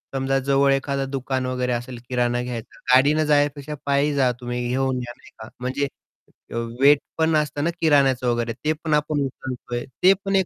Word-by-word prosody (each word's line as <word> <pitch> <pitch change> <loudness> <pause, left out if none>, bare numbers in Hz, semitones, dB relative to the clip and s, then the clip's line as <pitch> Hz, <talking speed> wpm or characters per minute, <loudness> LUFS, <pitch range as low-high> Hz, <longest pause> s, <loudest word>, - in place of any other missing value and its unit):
समजा 135 0 +1
जवळ 140 0 +3
एखादं 135 0 -1
दुकान 130 -1 -2
वगैरे 125 -1 -1
असेल 120 +1 -4
किराणा 120 -1 0
घ्यायचा 120 -2 -6
आहे 125 - +3
गाडीने 150 +4 +4
जाण्यापेक्षा 145 0 +1
पायी 140 +1 +2
जा, 130 -3 +3
तुम्ही 120 0 -3
घेऊन 130 +1 0
या 120 0 -6
नाही - - -18
का 110 - -8
म्हणजे 130 +3 -1 0.9
वेट 145 +1 +7 0.2
पण 160 0 +2
नसतं 150 -1 0
ना 165 - +2
किराण्याचं 135 -5 +3
वगैरे. 120 -1 0
ते 150 +6 -1
पण 155 -2 0
आपण 150 0 +1
उचलतोय. 125 -2 -5 0.2
ते 190 - +8
पण 195 0 0
एक 190 -2 +3
135 Hz, 185 wpm, -23 LUFS, 125-145 Hz, 0.9 s, ते